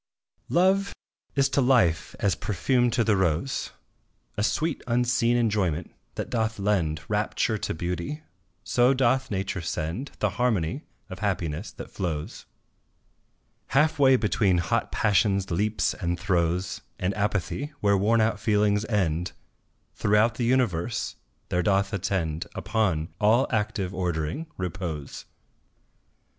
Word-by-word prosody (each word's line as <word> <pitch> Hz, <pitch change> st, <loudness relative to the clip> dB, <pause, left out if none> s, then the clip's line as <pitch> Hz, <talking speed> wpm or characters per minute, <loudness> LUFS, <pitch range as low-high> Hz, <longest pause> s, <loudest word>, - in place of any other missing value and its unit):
Love 190 Hz, +3 st, +2 dB, 0.4 s
is 135 Hz, -1 st, +4 dB
to 140 Hz, +1 st, +1 dB
life 90 Hz, -10 st, +2 dB
as 100 Hz, -2 st, +2 dB
perfume 120 Hz, +6 st, +1 dB
to 120 Hz, +1 st, +1 dB
the 110 Hz, -1 st, +3 dB
rose, 95 Hz, -, 0 dB, 0.7 s
A -, -, -2 dB
sweet 155 Hz, +8 st, 0 dB
unseen 120 Hz, 0 st, +2 dB
enjoyment 100 Hz, -8 st, 0 dB, 0.2 s
that -, -, -4 dB
doth 110 Hz, -1 st, 0 dB
lend 90 Hz, -6 st, 0 dB
Rapture 105 Hz, +1 st, 0 dB
to -, -, -2 dB
beauty 90 Hz, -, -4 dB, 0.4 s
so 125 Hz, +3 st, +3 dB
doth 130 Hz, +1 st, +2 dB
Nature 95 Hz, -2 st, -2 dB
send 85 Hz, -, -3 dB
The -, -, 0 dB
harmony 120 Hz, -, +1 dB, 0.3 s
of 95 Hz, -, -8 dB
happiness 90 Hz, -3 st, -2 dB
that -, -, -9 dB
flows 80 Hz, -6 st, -4 dB, 1.3 s
Half 155 Hz, +1 st, +3 dB
way 135 Hz, -2 st, +6 dB
between 100 Hz, -5 st, +2 dB
hot 85 Hz, 0 st, 0 dB
Passion's 100 Hz, -2 st, +2 dB
leaps 105 Hz, +5 st, +1 dB
and 85 Hz, -2 st, -3 dB
throes 90 Hz, -2 st, 0 dB, 0.2 s
And 90 Hz, +2 st, -1 dB
Apathy, 105 Hz, -, -1 dB
where 100 Hz, -3 st, +3 dB
worn 110 Hz, +4 st, +3 dB
out 110 Hz, -1 st, +1 dB
feelings 105 Hz, -1 st, +2 dB
end, 90 Hz, -6 st, 0 dB, 0.6 s
Throughout 105 Hz, +3 st, +3 dB
the 120 Hz, +2 st, -2 dB
universe, 115 Hz, -5 st, 0 dB, 0.3 s
there 90 Hz, -2 st, +1 dB
doth 100 Hz, +2 st, +1 dB
attend 85 Hz, -4 st, -1 dB
Upon 95 Hz, -7 st, 0 dB
all 110 Hz, +5 st, +4 dB
active 105 Hz, -4 st, -1 dB
ordering, 90 Hz, -, -2 dB
repose. 85 Hz, -5 st, -5 dB
105 Hz, 125 wpm, -26 LUFS, 90-120 Hz, 1.3 s, way